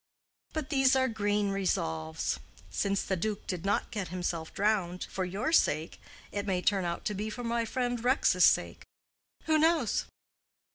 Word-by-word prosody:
But 310 -2 -4
these 270 -2 +4
are 260 0 +3
green 205 -3 0
resolves. 80 - -1 0.3
Since 200 - 0
the 190 - -1
duke 205 +3 -3
did 180 -3 -4
not 200 +4 0
get 205 -6 -3
himself 170 -2 -3
drowned 195 -4 0
for 190 - -3
your 195 - -2
sake, 160 - +2 0.3
it 205 0 -3
may 180 -2 0
turn 195 -3 +2
out 170 0 -3
to 210 - 0
be 210 +2 -3
for 245 +3 -6
my 235 0 0
friend 245 0 -2
Rex's 255 +3 +3
sake. - - +2 0.6
Who 315 -1 +3
knows?" 315 -8 +2
205 Hz, 160 wpm, -30 LUFS, 180-245 Hz, 0.6 s, these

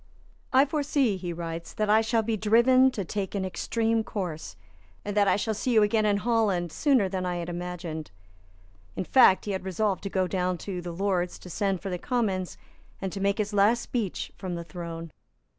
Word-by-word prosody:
"I 265 +1 +6
foresee," 285 -6 +1
he 180 -2 -5
writes, 165 0 -6
"that 215 - 0
I 215 +1 +5
shall 225 0 +1
be 225 0 0
driven 235 +5 +5
to 210 -7 -4
take 200 +2 -3
an 190 -1 -1
extreme 225 +5 0
course, 175 - -5 0.5
and 205 0 -3
that 205 -1 +4
I - - +4
shall 220 +2 -1
see 240 +4 -1
you 215 - +6
again 215 +1 +2
in 205 -1 +3
Holland 205 -6 +1
sooner 265 - +2
than 185 -1 -3
I 180 -1 -2
had 175 0 -4
imagined." 175 -3 -5 0.9
In - - -2
fact 190 -2 +5
he 205 - -2
had 190 -1 -3
resolved 190 +1 -1
to 200 - -4
go 190 -1 +1
down 180 -1 -1
to 185 -3 -4
the 175 0 -6
Lords, 180 0 -1
to 180 - -11
send 195 0 -1
for 195 - -3
the 180 - -3
Commons, 195 -7 -1 0.4
and 190 -1 -3
to 195 - -5
make 200 0 +1
his 210 -1 -2
last 210 +4 +4
speech 220 -7 -3
from 185 -2 -4
the 170 - -5
throne. 170 -1 -7
195 Hz, 205 wpm, -27 LUFS, 180-220 Hz, 0.9 s, I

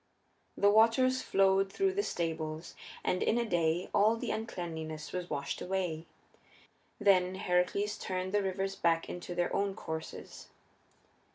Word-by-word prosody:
The 200 0 +5
waters 230 +4 +4
flowed 195 0 +3
through 385 - +1
the 405 - +1
stables, 160 - -3 0.3
and 180 - 0
in 230 - +2
a 240 - +1
day 175 -3 +1
all 215 +3 +4
the - - -3
uncleanness 160 -8 -5
was 180 -1 -4
washed 140 -1 -3
away. 180 -4 -2 0.9
Then 190 -3 +4
Heracles 190 +3 0
turned 185 0 -3
the 205 - +3
rivers 195 0 -2
back 165 -3 +1
into 175 0 -6
their 175 0 0
own 200 -1 0
courses. 160 0 -7
185 Hz, 140 wpm, -32 LUFS, 170-205 Hz, 0.9 s, The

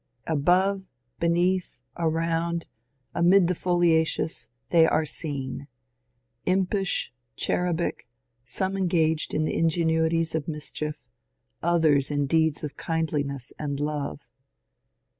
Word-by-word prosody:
Above, 180 +6 +2 0.4
beneath, 175 +2 +1 0.2
around, 165 0 0 0.5
amid 180 +2 +5
the 180 - +1
foliations 165 -2 +1 0.2
they 165 -2 +6
are 155 - +2
seen 140 - -4 0.4
— - - -47
impish, 195 - -1 0.2
cherubic, 175 -5 -1 0.4
some 190 +10 -2
en 190 -1 +1
gaged 160 -2 +1
in 155 +1 +1
ingenuities 165 0 +1
of 160 -2 -2
mischief, 150 -1 -4 0.6
others 155 -5 +3
in 145 -1 0
deeds 160 +1 +2
of 150 - -5
kindliness 145 -5 -2
and 145 -2 -3
love. 145 -1 -2
160 Hz, 105 wpm, -26 LUFS, 150-175 Hz, 0.6 s, they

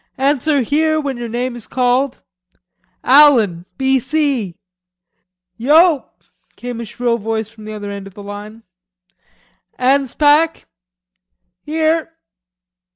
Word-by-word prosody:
"Answer 285 +1 +1
'Here' 310 +5 +1
when 275 -4 -3
your 240 -1 -5
name 245 +2 -3
is 240 - -9
called. 255 +1 0 0.8
Allan, 235 - +5
B.C." 265 - 0 1.0
"Yo!" 305 +5 +4 0.5
came 245 -1 -6
a - - -6
shrill 235 +2 -2
voice 220 0 -3
from 220 -2 -14
the 215 - -7
end 200 -2 -7
of 195 - -15
the 205 - -10
line. 205 +2 -9 1.1
"Anspach." 290 +4 +2 1.0
"Here." 320 - -1
255 Hz, 100 wpm, -17 LUFS, 220-290 Hz, 1.1 s, Allan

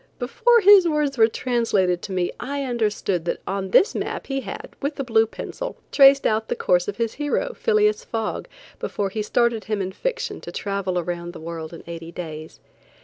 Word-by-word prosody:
Before 460 - +3
his 395 -2 +8
words 300 -3 0
were 225 -3 +6
translated 220 -7 0
to 200 - -7
me, 180 -2 0
I 280 +2 -3
understood 210 -8 -1
that - - -2
on 195 -1 -3
this 380 - +4
map - - -4
he 270 -1 -2
had, 195 -6 -7
with 285 +1 -3
a - - 0
blue 225 -3 +3
pencil, - - -6 0.2
traced 275 0 +6
out 220 +1 +1
the - - -1
course 180 -1 +2
of 205 - -4
his 230 -1 -1
hero, 300 +12 -1
Phileas 430 0 +2
Fogg, 225 - -3 0.3
before 200 -1 -2
he 215 - -2
started 235 +1 +1
him 215 -1 -2
in 190 -1 -2
fiction 485 - -3
to - - -8
travel 195 -2 -2
around 175 0 -3
the - - -9
world 160 -1 -6
in 165 - -10
eighty 165 0 -8
days. 160 -2 -8
220 Hz, 195 wpm, -23 LUFS, 185-280 Hz, 0.3 s, his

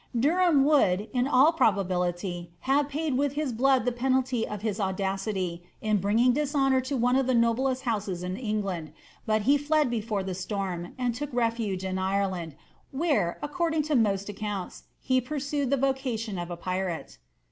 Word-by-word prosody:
Derfaam 315 +2 +4
would, 215 -9 +3
in 250 0 +1
all 285 +4 +5
probability, 180 - 0
have 280 +2 +2
paid 300 -1 -1
with 285 -1 +1
his 295 -4 -2
blood 260 +1 +3
the 250 - +2
penalty 255 -1 0
of 210 -1 -6
his 215 -2 -2
audacity 190 -2 -2 0.2
in 215 -1 +1
bringing 225 +6 +3
dishonour 270 -2 +2
on 265 -4 0
one 250 +1 +3
of 265 -1 +2
the 260 - +2
noblest 255 +3 +1
houses 205 -7 -2
in 180 +1 -3
England, 200 -8 -3 0.3
but 215 -1 +2
he 280 +5 +4
fled 300 -2 +2
before 215 -3 -2
the 190 0 -3
storm, 185 -2 -4
and 250 -2 0
took 290 +4 -5
refuge 230 -6 -1
in 190 0 -2
Ireland, 190 -5 -1 0.3
where, 275 - 0
according 320 +1 0
to 305 0 0
most 200 -4 +2
accounts, 205 -2 -5
he 260 -1 +1
pursued 285 0 -2
the 280 - +2
vocation 250 -7 -1
of 175 0 -5
a 175 - -5
pirate. 185 - -4
230 Hz, 170 wpm, -27 LUFS, 190-270 Hz, 0.3 s, all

